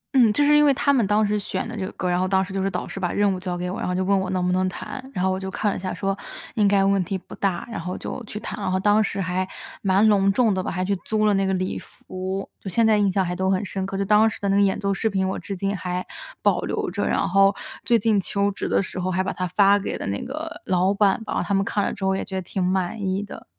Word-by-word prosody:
嗯， 235 -5 +6
就 290 - +2
是 295 +1 +5
因 295 - +6
为 290 - +6
他 280 +2 +2
们 240 -5 +3
当 210 +1 +3
时 210 0 0
选 190 0 -3
的 235 - -6
这 205 - -3
个 185 - -4
歌 - - -5
儿， - - +1
然 175 - +1
后 185 - +1
当 190 0 +2
时 190 - -9
就 195 - -1
是 195 - +1
导 180 -2 -4
师 195 - -6
把 180 -2 -1
任 205 -1 +2
务 185 - -4
交 180 -1 -3
给 180 0 -3
我， 190 - -5
然 - - -2
后 180 - -1
就 185 - 0
问 200 +1 +2
我 190 -1 -2
能 185 -1 0
不 180 - +1
能 185 0 +1
弹， 260 +7 -7
然 185 -7 -1
后 190 - +2
我 185 - -1
就 190 0 -5
看 205 +2 0
了 - - -3
一 - - -4
下， 185 0 -4
说 195 -1 -1 0.4
应 210 -2 +3
该 200 -1 +4
问 195 -1 +3
题 190 +2 -3
不 185 - -13
大， 190 -3 -2
然 215 - -4
后 180 +2 -4
就 255 - -6
去 210 - -5
弹。 215 - -6
然 185 - -1
后 185 - +1
当 210 +2 +4
时 200 -1 -3
还 185 0 -1 0.3
蛮 195 +2 +4
隆 195 -2 +4
重 220 0 +3
的 190 - -1
吧， - - -4
还 185 0 -2
去 200 +1 +1
租 215 -1 +1
了 210 - +4
那 195 0 +1
个 190 - +1
礼 185 0 -2
服， 190 +1 -6
就 195 - -6
现 230 +5 +2
在 220 -1 +5
印 200 -2 +2
象 190 0 +1
还 180 0 -2
都 190 +1 0
很 190 +1 +1
深 190 0 -3
刻。 195 - -4
就 200 - 0
当 210 +2 +5
时 - - -7
的 200 - -2
那 195 - +3
个 200 - +4
演 200 0 +2
奏 200 -1 0
视 220 +3 0
频 190 -2 0
我 190 - -2
至 200 - -5
今 195 +2 -1
还 180 0 -3 0.4
保 - - +3
留 - - -2
着， - - -1
然 - - +1
后 195 +1 +4 0.3
最 235 - +4
近 215 -2 +2
求 200 +2 0
职 195 - -4
的 - - +2
时 185 - -6
候 185 - -1
还 185 +1 0
把 195 - -2
它 185 - -2
发 200 +3 +4
给 200 - -3
了 - - -5
那 100 +1 -2
个 320 +6 -6
老 185 +2 +2
板 200 +1 +2
吧， - - -2
他 200 +3 0
们 195 0 +2
看 205 - 0
了 - - 0
之 195 - -4
后 190 0 +2
也 - - -2
觉 190 - -7
得 190 - -1
挺 185 +1 -3
满 185 +3 -1
意 190 +1 -1
的。 205 - -10
195 Hz, 345 characters per minute, -23 LUFS, 185-205 Hz, 0.4 s, 嗯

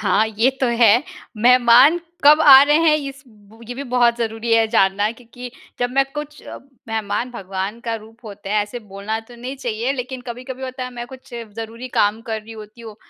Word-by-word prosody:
हाँ, 215 +1 +2
ये 220 +4 +1
तो 260 - +2
है। 230 +2 +5 0.3
मेहमान 250 +7 +5 0.3
कब 300 +2 +7
आ 270 -2 +9
रहे 295 +1 +3
हैं 320 -2 +4
इस 280 -1 -7
ब 215 0 -21
ये 245 - -5
भी 270 - -6
बहुत 240 -1 +3
ज़रूरी 225 0 -3
है 225 0 +3
जानना 205 -1 +2
क्योंकि 245 +1 -10 0.3
जब 245 0 -1
मैं 275 +1 +2
कुछ 295 0 -8
अ, - - -9 0.3
मेहमान 220 +2 -3
भगवान 195 0 -5
का 230 -1 -3
रूप 225 +2 -18
होते 205 -2 -10
हैं। 210 +1 +1
ऐसे 210 +4 -7
बोलना 205 +3 -4
तो 240 - -13
नहीं 255 +3 -7
चाहिए 240 0 -3
लेकिन 255 -1 -6
कभी-कभी 255 +2 -8
होता 255 0 -5
है, 250 - -7
मैं 240 -1 -7
कुछ 255 -1 -13 0.3
ज़रूरी 230 +3 -8
काम 210 +2 +2
कर 220 -1 -2
रही 225 +1 -12
होती 215 +1 -12
हूँ 220 -2 -11
235 Hz, 205 wpm, -20 LUFS, 220-255 Hz, 0.3 s, आ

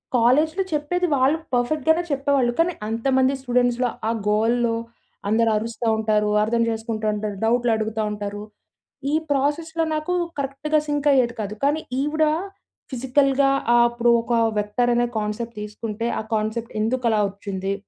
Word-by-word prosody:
కాలేజ్‌లో 300 +10 +3
చెప్పేది 355 +5 0
వాళ్ళు 275 +4 +3 0.2
పర్ఫెక్ట్‌గానే 310 +7 +2
చెప్పేవాళ్ళు 275 -3 +1
కానీ 345 +2 +3
అంతమంది 260 +4 +1
స్టూడెంట్స్‌లో, 245 -1 +1 0.2
ఆ - - +2 0.2
గోలలో, 230 +2 +2 0.5
అందరూ 225 +1 +3
అరుస్తా 230 +1 -3
ఉంటారు. 215 -1 +1
అర్థం 230 +2 +1
చేసుకుంటా 220 -1 -3
ఉంటారు, 210 -1 -4
డౌట్‌లడుగుతా 225 -2 +1
ఉంటారు. 205 0 -5 0.7
ఈ - - -1 0.2
ప్రాసెస్‌లో 320 +4 0
నాకు 310 +4 -2 0.3
కరెక్ట్‌గా 280 +3 0
సింక్ 290 0 -1
అయ్యేది 245 -3 +2
కాదు. 210 0 -4
కానీ 295 +3 +2 0.2
ఈవిడ 305 +2 +1 0.7
ఫిజికల్‌గా 270 +2 +2 0.3
ఆహ్, 240 - +6
అప్పుడు 235 0 +2
ఒక 235 +1 -3 0.3
వెక్టారనే 240 +3 +1
కాన్సెప్ట్ 215 +2 -4
తీసుకుంటే, 210 +2 -4
"ఆ - - -2
కాన్సెప్ట్ 220 +2 -3
ఎందుకు 245 +3 -1
అలా 220 -1 +2
ఓచ్చింది? 195 -1 -4
240 Hz, 130 wpm, -23 LUFS, 220-275 Hz, 0.7 s, ఆహ్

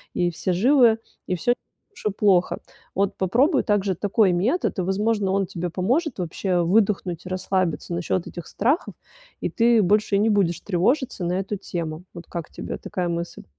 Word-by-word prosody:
и 175 - +2
все 180 +2 -2
живы, 235 +3 +5 0.3
и 185 - -1
всё 240 +8 +1
не - - +2
так 410 - -50
уж - - -15
и - - +1
плохо. 190 -4 +3 0.4
Вот 195 +1 0
попробуй 255 - +2
также 200 -3 +1
такой 205 +2 +2
метод, 225 - 0
и, - - +2
возможно, 200 +1 0
он 195 -1 +1
тебе 175 +1 -4
поможет 250 - 0
вообще 180 +1 -1
выдохнуть, 190 -2 +1
расслабиться 185 -2 -1
насчет 175 +1 -1
этих 175 -2 -8
страхов, 270 - 0 0.5
и - - -1
ты 230 -1 +4
больше 205 +2 +2
не 215 +2 +3
будешь 195 -5 +2
тревожиться 210 - 0
на 175 - 0
эту 195 +2 -3
тему. 165 -3 -5
Вот 170 - -9
как 170 -3 -6
тебе - - -6
такая 180 -2 -3
мысль? 170 0 -4
195 Hz, 175 wpm, -23 LUFS, 175-220 Hz, 0.5 s, живы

